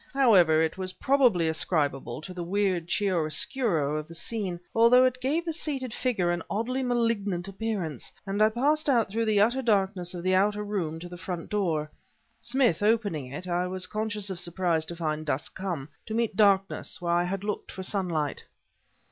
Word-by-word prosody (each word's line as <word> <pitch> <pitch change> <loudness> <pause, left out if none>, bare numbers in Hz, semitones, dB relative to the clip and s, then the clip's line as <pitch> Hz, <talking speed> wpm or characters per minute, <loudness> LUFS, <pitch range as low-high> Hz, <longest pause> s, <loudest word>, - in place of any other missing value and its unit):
However, 180 -12 +5
it 160 +4 -2
was 185 -1 -3
probably 240 -7 +3
ascribable 145 -5 0
to 180 +4 -8
the 180 -1 -5
weird 185 -2 0
chiaroscuro 175 - 0
of 155 - -8
the 165 - -8
scene, 190 -2 -3
although 235 +3 +6
it 255 0 0
gave 310 +6 0
the 330 - -2
seated 275 -7 -3
figure 205 -11 0
an 175 -1 -1
oddly 245 +5 -1
malignant 230 -7 0
appearance, 195 - -3
and 200 +1 -2
I 215 - +6
passed 290 +7 +1
out 235 -7 +2
through 225 +2 0
the 215 -2 +2
utter 240 +6 +3
darkness 195 -6 0
of 175 - -6
the 185 0 +2
outer 205 +2 +2
room 185 -7 -3
to 175 - -7
the 175 0 -9
front 175 0 -6
door. 170 -7 0 0.5
Smith 240 -9 +1
opening 205 - +1
it, 180 +6 -6
I 180 +1 0
was 185 0 -1
conscious 210 -2 -3
of 180 - -4
surprise 175 -2 0
to 170 - -5
find 155 -2 -2
dusk 145 -1 -2
come 175 -8 -4 0.2
to 220 - -3
meet 230 -3 0
darkness 195 -2 +2
where 170 -1 -1
I 175 +1 +2
had 195 +2 -3
looked 210 0 -4
for 190 - -7
sunlight. 175 -7 -2
190 Hz, 185 wpm, -27 LUFS, 170-225 Hz, 0.5 s, although